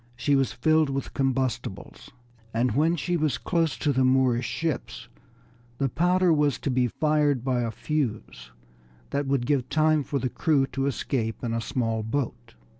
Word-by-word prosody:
She 135 +4 +1
was 135 -1 +1
filled 155 -2 +2
with 135 -1 -4
combustibles, 130 -7 -2 0.5
and 120 +1 +2
when 155 +8 +2
she 175 +2 -1
was 155 -3 0
close 165 -4 0
to 145 - 0
the 130 0 +2
Moorish 130 -2 +2
ships 125 -7 -4 0.7
the 135 -1 0
powder 180 +5 +3
was 150 -3 +2
to 140 - -1
be 125 -1 +2
fired 150 -1 +1
by 130 -2 0
a 115 - -1
fuse 115 - -3 0.6
that 140 0 -1
would 135 -3 0
give 135 -2 0
time 155 -1 +3
for 140 - -2
the 130 - -1
crew 145 0 +1
to 135 0 -2
escape 115 -5 -2
in 115 -2 -2
a 115 - -1
small 115 -2 -1
boat. 115 - -4
135 Hz, 170 wpm, -26 LUFS, 120-150 Hz, 0.7 s, powder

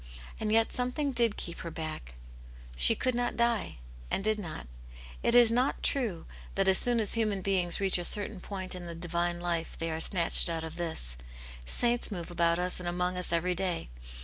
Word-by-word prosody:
And 215 -1 -1
yet 225 0 +3
something 250 +3 0
did 235 -4 +2
keep 170 - -5
her 170 - -5
back; 155 - -6 0.6
"she - - +6
could 255 - 0
not 240 0 -1
die,'* 235 - 0 0.3
«nd 195 - +1
^v^ 215 0 +1
uo\. 160 - -6 0.6
It 235 - +2
is 240 -2 +8
not 250 +3 +2
Aunt - - -17
yane^s - - +3
Hero. 275 -3 0
i6i 205 -6 -3
true 165 - -13 0.3
that 195 0 +1
as 190 0 +6
soon 240 -1 +2
as 215 - +3
human 215 -4 0
beings 180 -3 +1
reach 195 -2 +2
a - - -3
certain 205 +1 0
•point 190 -2 -4
in 180 -1 -7
the 170 - -6
divine 175 0 -1
life 170 -1 -3
they 165 0 -3
are 160 - -3
snatched 170 0 +2
out 165 -1 -3
of 160 - -7
this: 160 - -4 0.5
saints 240 - +1
move 175 -3 -5
about 170 -1 +2
us 180 +1 -2
and 175 -1 -3
among 180 +1 -1
us 180 -1 -1
every 170 +2 +1
day. 180 - -2
180 Hz, 215 wpm, -30 LUFS, 170-220 Hz, 0.6 s, is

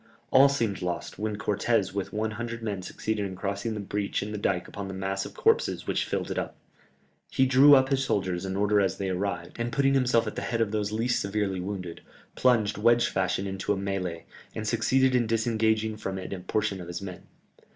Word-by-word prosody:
All 135 +1 +7
seemed 115 -9 -1
lost, 90 +1 -4
when 105 0 -2
Cortès 105 -1 0
with 100 -1 -3
one 110 +1 -1
hundred 115 +1 -5
men 100 -4 -3
succeeded 105 +3 -3
in 95 -1 -4
crossing 100 +3 -3
the - - -4
breach 100 0 -2
in 105 - -5
the 105 - -3
dike 90 -3 0
upon 100 -1 -6
the 95 - -6
mass 95 0 -2
of - - -14
corpses - - +2
which - - 0
filled - - -3
it - - -1
up. - - -5 0.7
He 130 - +3
drew 135 +3 +7
up 130 0 +4
his 135 -1 +1
soldiers 95 -6 -1
in 95 0 -3
order 105 +1 +3
as 95 -1 0
they 95 -1 -2
arrived, 90 0 -3
and 120 0 -1
putting 135 0 +2
himself 125 -3 +3
at 105 - -5
the - - -3
head 115 - -2
of 110 -3 +1
those 105 -1 -1
least 115 +3 0
severely 100 -2 -1
wounded, 90 -3 -5 0.3
plunged 110 -5 +2
wedge 120 +2 +4
fashion 95 +1 0
into 95 +1 -1
the - - -4
mêlée, 95 -4 -3 0.3
and 110 0 -4
succeeded 130 +3 +3
in 120 -2 +2
disengaging 110 -1 +1
from 95 -2 -4
it 95 +1 -5
a 95 - -5
portion 95 0 -1
of 85 - -8
his 85 +2 -5
men. 90 -2 -8
105 Hz, 215 wpm, -27 LUFS, 95-115 Hz, 0.7 s, All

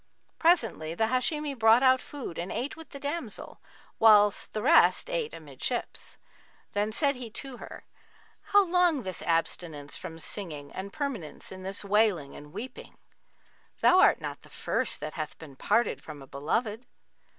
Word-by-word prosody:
Presently 225 - +2
the 220 +4 +1
Hashimi 290 +4 0
brought 225 0 +5
out 260 0 +5
food 270 - -7
and 175 +2 -4
ate 265 +4 -3
with 325 0 -12
the 280 - -9
damsel, 285 -5 -5 0.4
whilst 210 -2 +5
the 215 - -3
rest 335 - +5
ate - - -1
amidships. - - -5 0.6
Then 205 +1 0
said 280 +4 +1
he 245 -2 -7
to 260 +3 -7
her, - - -10 0.6
'How 405 -1 +5
long 350 -6 +3
this 185 -3 -5
abstinence 165 -3 -1
from 165 - -8
singing 155 -5 -6
and 195 +1 -6
permanence 260 - -5
in 185 0 -8
this 195 +2 -4
wailing 200 -8 +2
and 150 0 -11
weeping? 255 +10 -8 0.8
Thou 370 - +6
art - - +6
not - - -6
the - - -17
first - - -1
that 155 - -5
hath 155 -2 -5
been 150 -4 -12
parted 230 - +1
from 150 -3 -10
a - - -11
beloved!' 210 - -2
220 Hz, 160 wpm, -28 LUFS, 170-280 Hz, 0.8 s, Thou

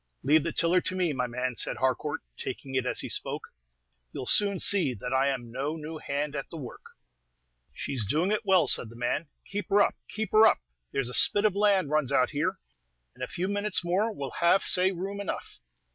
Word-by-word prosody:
"Leave 150 +2 +4
the 170 - -2
tiller 175 +2 +2
to 185 - -4
me, 180 -4 0
my 125 -2 -1
man," 125 +1 -3
said - - -2
Harcourt, 130 +3 -1
taking 135 - -6
it 130 -1 0
as - - 0
he - - -5
spoke. - - -4 0.6
"You - - -6
'll - - -7
soon 200 +5 +4
see 175 -11 +3
that 125 +5 -5
I 135 +1 +3
'm 120 -4 -4
no 140 +6 -3
new 160 0 -7
hand 145 +1 -3
at 140 - -5
the 165 - -8
work." 130 -6 -9 0.9
"She's 130 -5 -3
doing 165 - +1
it 215 - 0
well," 190 -4 +4
said 115 - +4
the 115 - -13
man. 120 +6 -2 0.2
"Keep 205 +1 -5
her 200 +1 +4
up! - - +3 0.2
keep 220 -2 -4
her 220 +1 +7
up! - - +3 0.3
there's 135 -3 -1
a - - -6
spit 205 - +5
of 205 -3 +2
land 200 -7 +2
runs 150 -4 +1
out 130 -2 +2
here; 155 +5 -1 0.6
in 130 - -16
a 130 - -2
few 180 +2 -3
minutes 205 -1 -1
more 195 +6 +1
we'll 140 - -6
have 170 +3 +4
say 185 +1 +3
room 195 +2 -5
enough." 200 - -6
155 Hz, 220 wpm, -28 LUFS, 130-195 Hz, 0.9 s, her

